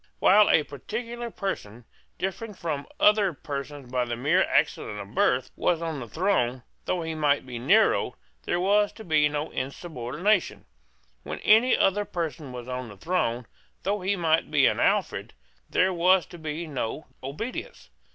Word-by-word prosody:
While 210 +2 +6
a 155 - +5
particular 235 - -6
person, 120 - -5 0.3
differing 200 +3 -4
from 155 -5 -4
other 210 -3 +4
persons 140 -2 -7
by 125 -1 +1
the 120 -1 -3
mere 150 +10 +2
accident 105 - 0
of 100 +1 -9
birth, 125 +1 +2
was 175 -2 +1
on 165 -3 -3
the 120 - -7
throne, 130 - 0 0.2
though 180 -2 -1
he 160 0 -3
might 145 -3 +1
be 125 -2 -6
a - - -5
Nero, 120 - +3 0.3
there 175 - 0
was 205 +3 +3
to 220 - -11
be 155 -5 +3
no 150 +1 -3
insubordination. 155 - -1 0.6
When 75 +5 -6
any 225 +4 +5
other 200 +2 +2
person 160 -7 -4
was 125 -1 -8
on 125 -1 -4
the 100 - -12
throne, 125 - -1 0.4
though 200 +1 -1
he 195 +2 +1
might 165 -3 +1
be - - +4
an - - +2
Alfred, - - 0 0.3
there 185 +1 +2
was 180 +1 +4
to 175 - -9
be 155 +2 -4
no 140 -1 -4 0.2
obedience. 150 - -6
160 Hz, 165 wpm, -26 LUFS, 130-190 Hz, 0.6 s, While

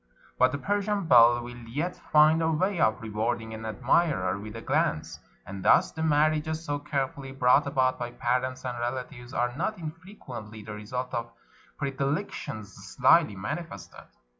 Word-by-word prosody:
But 130 0 +5
the 140 - -2
Persian 205 +3 -1
belle 120 -4 +6
will 120 0 -8
yet 155 +9 -2
find 155 +2 +4
a 160 - +2
way 185 +4 0
of 110 -3 +2
rewarding 110 +1 -2
an 110 0 -6
admirer 110 - +1
with 105 +2 -8
a 115 - -6
glance; - - 0 0.3
and 95 0 -7
thus - - +5
the 160 - -6
marriages 155 +1 +1
so 145 -2 -2
carefully 140 -2 -3
brought 135 +2 +3
about 130 -2 +1
by 120 0 -3
parents 130 +2 -2
and 120 -1 -3
relatives 120 +1 -5
are 120 0 -1
not 200 +8 -2
infrequently 155 - -9
the 105 - -7
result 125 +5 -5
of 120 -1 -3 0.5
predilec 140 +6 -1
tions 105 -3 -7
slyly 105 - +3
manifested. 100 - -6
130 Hz, 160 wpm, -27 LUFS, 115-155 Hz, 0.5 s, belle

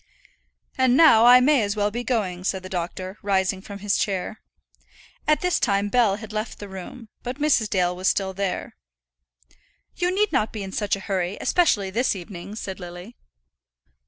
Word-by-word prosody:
"And 260 0 +4
now 240 -8 +7
I 250 +1 +9
may 270 0 +4
as 205 0 -1
well 205 0 0
be 240 +3 -4
going," 200 -7 -2
said 190 0 -2
the 185 - -8
doctor, 185 +2 -5
rising 190 -1 0
from 200 +1 -9
his 200 0 0
chair. 200 +2 -2 0.9
At 305 0 +3
this 360 -1 +1
time 200 -4 +1
Bell 225 -4 +3
had 215 0 -9
left 215 +1 -4
the 205 - -8
room, 195 +5 -9
but 250 +2 -5
Mrs. 290 -8 +2
Dale 180 -2 +1
was 185 +1 -2
still 190 -1 +1
there. 195 -1 -3 1.2
"You 355 0 +1
need 405 +3 +1
not 220 -7 +1
be 215 -2 -5
in 190 - -7
such 205 0 0
a 195 - -9
hurry, 190 -1 -2
especially 210 - +2
this 235 +2 +1
evening," 185 +2 -8
said 195 -3 -6
Lily. 175 +5 -9
205 Hz, 180 wpm, -24 LUFS, 190-240 Hz, 1.2 s, I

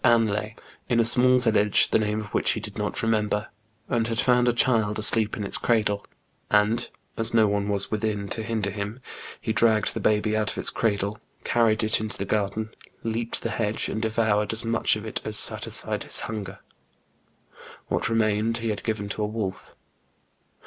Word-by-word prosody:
Anlaye, 110 -2 +2 0.3
in 120 -2 +2
a 115 - +4
small 125 +2 +4
village, 110 -4 +3
the - - +3
name 105 0 -1
of 105 - -11
which - - +2
he - - -3
did - - -6
not - - -2
remember, 105 -1 0 0.4
and 115 -1 0
had 115 -1 -2
found 125 0 +3
a - - +4
child 115 -3 +2
asleep 110 0 +1
in 105 - -3
its 100 - -1
cradle; 105 -3 +1 0.5
and 105 +3 +2 0.3
as 115 +1 +3
no 110 -1 +6
one 100 0 -1
was 100 -1 -1
within 105 -2 -2
to 115 - -2
hinder 110 -3 -2
him, 105 +4 -5 0.4
he 110 - -2
dragged 110 -2 +3
the - - -3
baby 110 0 +1
out 110 -1 0
of - - -4
its - - +1
cradle, 100 -1 -1 0.2
carried 115 -1 +2
it 110 +1 +3
into 110 -1 -4
the 100 - -3
garden, 105 +2 -1 0.3
leaped 115 +1 -2
the - - -2
hedge, 110 -1 -1
and 110 - -3
devoured 110 -2 +1
as 110 +1 -2
much 115 -1 +2
of 105 0 -7
it 110 - -3
as 110 -1 +1
satisfied - - +1
his - - 0
hunger. 100 -3 -5 1.3
What - - -1
remained 110 0 +1
he 115 -1 -3
had 105 -2 -3
given 110 -2 -2
to 105 - -3
a - - 0
wolf. 105 -3 -5
110 Hz, 190 wpm, -25 LUFS, 105-115 Hz, 1.3 s, no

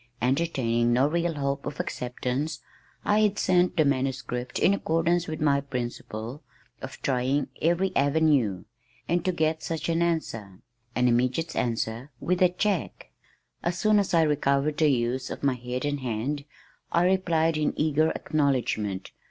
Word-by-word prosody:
Entertaining 125 -3 +1
no 125 +3 +4
real 170 +1 0
hope 140 -1 -2
of 145 - -6
acceptance, 125 +5 -3 0.5
I 210 +1 +3
had 210 -1 +2
sent 180 0 +2
the 155 - +4
manuscript 130 -2 -1
in 195 - +4
accordance 170 -1 +1
with 155 -1 -4
my 140 -2 +3
principle 120 -1 -5 0.4
of 130 - -8
trying 135 +2 0
every 175 +4 +1
avenue, 140 - +2 0.4
and 175 0 +1
to 185 - +1
get 160 -2 0
such 165 0 -3
an 165 0 +1
answer 115 - -2 0.4
an 125 0 +3
immediate 125 +7 +1
answer 115 +2 -2
with 180 +1 -1
a 180 - +6
check! 185 -1 -2 0.5
As 175 +1 -1
soon 215 +3 +4
as 195 -3 0
I 165 - +5
recovered 145 0 +1
the 155 -2 +4
use 125 0 0
of - - -7
my 140 -2 +3
head 125 +2 -4
and 145 0 -1
hand, 130 +4 -3 0.5
I 170 +1 +3
replied 170 -4 +2
in 150 -1 -1
eager 155 +1 +3
acknowledgment. 125 - -1
145 Hz, 150 wpm, -26 LUFS, 125-165 Hz, 0.5 s, a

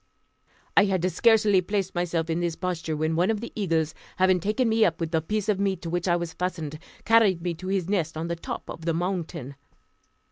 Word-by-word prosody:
I 200 - +7
had 185 -3 +1
scarcely 210 +1 +4
placed 195 0 -2
myself 175 -2 -1
in 165 0 -1
this 170 -2 -1
posture 165 -4 -3
when 155 +1 0
one 175 +5 +2
of 220 -2 +1
the 235 - -7
eagles, 165 -6 0 0.2
having 185 0 +4
taken 215 +7 0
me 225 0 +3
up 170 -4 +2
with 165 -1 -2
the 160 -1 +2
piece 210 +5 -2
of 205 -3 +1
meat 195 -3 0
to 165 - -4
which 175 +1 -1
I 175 - +4
was 170 -1 -3
fastened, 165 -4 -4 0.3
carried 210 -6 +4
me 175 -1 -1
to 185 +3 -8
his 190 -3 0
nest 170 -6 -1
on 165 +1 -3
the 170 - -2
top 165 - -6
of 165 - -8
the 165 -1 +1
mountain. 170 -6 -3
175 Hz, 220 wpm, -26 LUFS, 165-195 Hz, 0.3 s, I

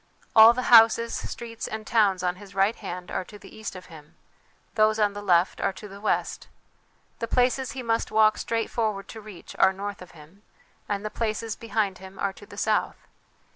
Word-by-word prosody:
All 225 +1 +9
the 255 +1 -3
houses, 230 0 +6
streets 230 -1 -6
and 220 0 -6
towns 205 -5 +2
on 180 0 -1
his 200 0 -14
right 195 +4 +2
hand 180 -2 -7
are - - -2
to 210 - -12
the - - -15
east 220 -3 -7
of 185 - -10
him, 155 -3 -15 0.6
those 215 0 +3
on 210 -2 +2
the 205 - -7
left 180 -2 +2
are - - +1
to 200 +3 -10
the 200 0 -12
west. 215 - -2 0.7
The 230 - -3
places 255 +2 +1
he 260 -2 -6
must 230 -1 0
walk 215 0 +3
straight 230 -1 -2
forward 215 -4 -2
to 220 - -9
reach 205 -4 -12
are 190 - +6
north 200 +1 -6
of 180 - -11
him, 160 +7 -17 0.5
and 205 0 -2
the 215 - -4
places 225 0 -3
behind 215 -4 -2
him 190 0 -12
are 200 -1 -2
to 205 - -15
the 200 - -13
south. 215 0 0
210 Hz, 205 wpm, -25 LUFS, 195-225 Hz, 0.7 s, All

